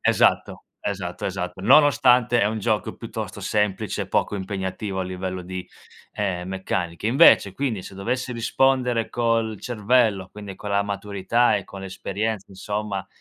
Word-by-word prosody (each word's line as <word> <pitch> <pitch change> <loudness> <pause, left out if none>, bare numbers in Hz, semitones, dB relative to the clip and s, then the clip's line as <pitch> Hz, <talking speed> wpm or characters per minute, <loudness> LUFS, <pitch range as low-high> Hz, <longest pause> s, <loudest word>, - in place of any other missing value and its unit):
Esatto - - +2 0.2
esatto - - -4
esatto. - - -4
Nonostante 125 -4 +5
è - - +4
un 110 +1 0
gioco 110 0 -1
piuttosto 110 -4 -6
semplice 105 0 -1
e - - -8
poco - - 0
impegnativo 95 0 -3
a - - 0
livello 95 0 -4
di 95 0 -6 0.5
ehm 90 -3 -2
meccanica. 95 -1 -3
Invece, 115 -5 +6
quindi, 125 -6 -2
se 95 - -10
dovessi 125 +6 -2
rispondere 125 0 +1
col 115 -2 0
cervello, 110 -4 +1
quindi 100 -2 -8
con 105 - -8
la 100 0 +2
maturità 100 +3 +1
e 100 - -4
con 95 - -10
l'esperienza, 100 +2 -3
insomma, 100 0 -4
105 Hz, 145 wpm, -24 LUFS, 95-115 Hz, 0.5 s, Invece